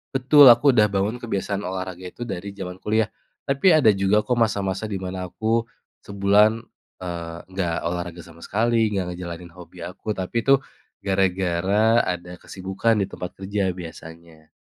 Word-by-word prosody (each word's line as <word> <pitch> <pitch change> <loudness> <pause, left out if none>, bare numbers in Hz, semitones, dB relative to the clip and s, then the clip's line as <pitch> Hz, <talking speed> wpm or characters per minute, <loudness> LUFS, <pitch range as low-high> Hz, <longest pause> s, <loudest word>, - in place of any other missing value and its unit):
Betul, 140 +3 +6
aku 135 +2 +4
udah 105 -3 +4
bangun 100 +4 0
kebiasaan 100 -2 -2
olahraga 95 -1 -5
itu 120 0 -7
dari 100 +1 -5
zaman 95 -2 -7
kuliah. 110 0 +1 0.4
Tapi 140 +7 +3
ada 115 -10 +5
juga 100 +2 +2
kok 125 +3 -1
masa-masa 100 -4 0
di 100 -3 -3
mana 95 0 -5
aku 115 +1 0 0.4
sebulan, 100 +3 +3 0.4
eee, 85 -2 -6
enggak 95 -3 -2
olahraga 85 0 -4
sama 85 0 -15
sekali, 115 +1 +1
enggak 90 -3 -2
ngejalanin 85 -1 -7
hobi 90 0 -13
aku. 100 +4 -6
Tapi 95 +1 -5
itu 135 -1 +5 0.4
gara-gara 95 +3 +2
ada 90 0 -4
kesibukan 95 +5 -1
di 100 - 0
tempat 90 -2 -7
kerja 95 -1 -1
biasanya. 80 -2 -11
95 Hz, 150 wpm, -23 LUFS, 90-110 Hz, 0.4 s, Betul